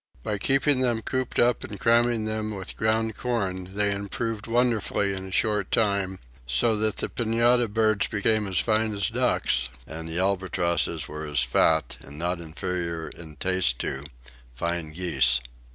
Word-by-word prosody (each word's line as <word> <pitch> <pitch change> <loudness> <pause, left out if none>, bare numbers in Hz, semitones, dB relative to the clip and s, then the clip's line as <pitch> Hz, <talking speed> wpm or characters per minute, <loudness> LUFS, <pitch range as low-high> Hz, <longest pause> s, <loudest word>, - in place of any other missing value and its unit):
By 105 -1 -2
keeping 135 +4 +3
them 120 -3 +1
cooped 130 -1 -2
up 120 0 +3
and 100 - -7
cramming 115 -1 +3
them 110 -1 -2
with 95 -2 -5
ground 110 0 0
corn 95 -6 -3
they 105 0 +2
improved 105 +2 -3
wonderfully 115 -4 +1
in 95 0 -6
a - - -9
short 105 0 +1
time; 100 -3 +1 0.3
so 65 - +2
that 110 0 0
the - - -1
pintada 120 +1 +2
birds 110 -1 +1
became 110 0 +1
as 95 -2 -1
fine 110 0 +1
as 100 -2 +1
ducks, 60 -1 +1 0.2
and 80 +3 -7
the 80 - -2
albatrosses 90 -4 0
were 75 0 -6
as 75 -3 +1
fat, 80 +6 +2
and 70 +2 -11
not 85 +2 -1
inferior 85 -1 -4
in 80 -3 -11
taste 90 -6 +1
to, 70 +1 -3 0.5
fine 85 +2 -2
geese. 70 -8 +3
100 Hz, 160 wpm, -26 LUFS, 85-110 Hz, 0.5 s, keeping